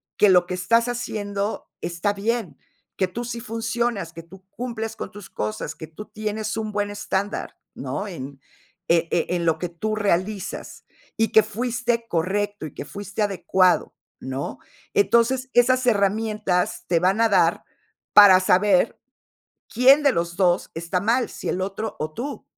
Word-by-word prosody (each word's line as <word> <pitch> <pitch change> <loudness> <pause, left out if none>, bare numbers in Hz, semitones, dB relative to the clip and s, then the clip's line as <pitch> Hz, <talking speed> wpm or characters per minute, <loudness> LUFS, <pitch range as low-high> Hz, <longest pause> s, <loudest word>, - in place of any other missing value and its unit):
que 205 - +5
lo 180 -1 +5
que 180 - -5
estás 230 +7 +2
haciendo 205 -3 -3
está 175 +4 -1
bien, 215 -2 -2 0.4
que 190 - +2
tú 235 +6 -5
sí 235 -1 -5
funcionas, 225 -5 -2
que 165 - -9
tú 190 +2 -16
cumples 230 -2 -5
con - - -6
tus 205 -1 -11
cosas, 105 0 -4
que 160 - -8
tú 210 +7 -10
tienes 215 0 -4
un 215 -1 -3
buen 205 0 -1
estándar, 205 0 -3 0.2
¿no?, 140 +10 -4
en, 140 -6 -8 0.5
e 170 0 +3
e 175 +1 0
en 170 - -1
lo 160 -1 +2
que 180 - -2
tú 215 +6 -3
realizas, 200 0 -2 0.3
y 225 0 +1
que 220 - +7
fuiste 235 +1 -2
correcto 200 +2 -1
y - - -13
que - - -7
fuiste 205 +1 -6
adecuado, 190 -2 +2 0.3
¿no? 130 +2 -5 0.3
Entonces, 260 - +2
esas 255 +1 +4
herramientas 210 -3 +1
te 170 -2 +2
van 190 +5 +2
a 230 - +5
dar 200 - +3 0.5
para 195 -3 +9
saber 185 0 +3 0.8
quién 265 +5 +6
de 280 - +5
los 170 -2 -2
2 180 -2 +2
está 170 +2 -2
mal, 235 +5 +1
si - - -6
el 185 - -1
otro 200 +3 -4
o 155 0 -3
tú. 280 - -5
205 Hz, 160 wpm, -23 LUFS, 180-225 Hz, 0.8 s, para